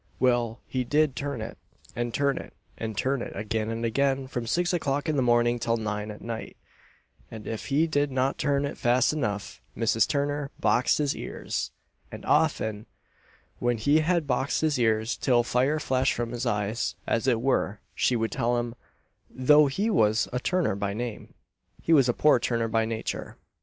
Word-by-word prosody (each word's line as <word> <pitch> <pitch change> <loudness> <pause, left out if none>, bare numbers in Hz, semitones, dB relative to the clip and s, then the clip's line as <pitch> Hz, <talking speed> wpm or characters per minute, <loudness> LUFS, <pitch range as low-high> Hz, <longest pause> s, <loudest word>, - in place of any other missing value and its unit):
Well, 120 -2 +1
he 130 -1 -2
did 145 +2 +2
turn 140 -4 -3
it; 110 - -8 0.4
and 120 0 -2
turn 140 +2 +1
it, - - -11 0.2
and 110 -2 -5
turn 135 -1 0
it, - - -6
again 110 +2 -2
and 115 +1 -2
again, 135 +3 +1
from 120 -3 -4
six 175 +8 +1
o'clock 145 -3 -1
in 155 - +1
the 135 - +2
morning 120 -1 +3
till 115 0 0
nine 105 -1 -3
at 105 - -9
night; 115 -1 -6 0.7
and 110 -2 -9
if 110 - -5
he 145 +3 +3
did 145 -3 0
not 130 +1 0
turn 140 -1 +1
it 140 - -5
fast 125 +3 +3
enough, 105 -9 -3 0.2
Mrs. 115 0 +2
Turner 145 0 -1
boxed 115 +3 +3
his 145 -2 0
ears; - - -4 0.4
and - - -9
often, 110 0 +1 0.7
when 120 -1 +1
she 145 +8 +3
had 170 0 +1
boxed 135 0 0
his 155 -4 +1
ears 110 0 +1
till 120 -3 +2
fire 130 +6 +1
flashed 130 -1 +1
from 120 -1 -3
his 120 +1 -3
eyes, 105 0 -1
as 115 +3 0
it 120 -3 +3
were, 115 -5 0
she 125 - +1
would 115 -1 -1
tell 120 +1 0
him, 120 -1 -2 0.6
"though 150 +3 +5
he 200 +11 0
was 110 - +3
a 125 - 0
turner 180 - 0
by 100 0 -2
name, 120 -1 -6 0.4
he 165 - +1
was 135 -5 +5
a - - +3
poor 150 -4 +4
turner 115 -1 0
by 115 0 +1
nature." 110 0 -4
120 Hz, 185 wpm, -27 LUFS, 115-140 Hz, 0.7 s, though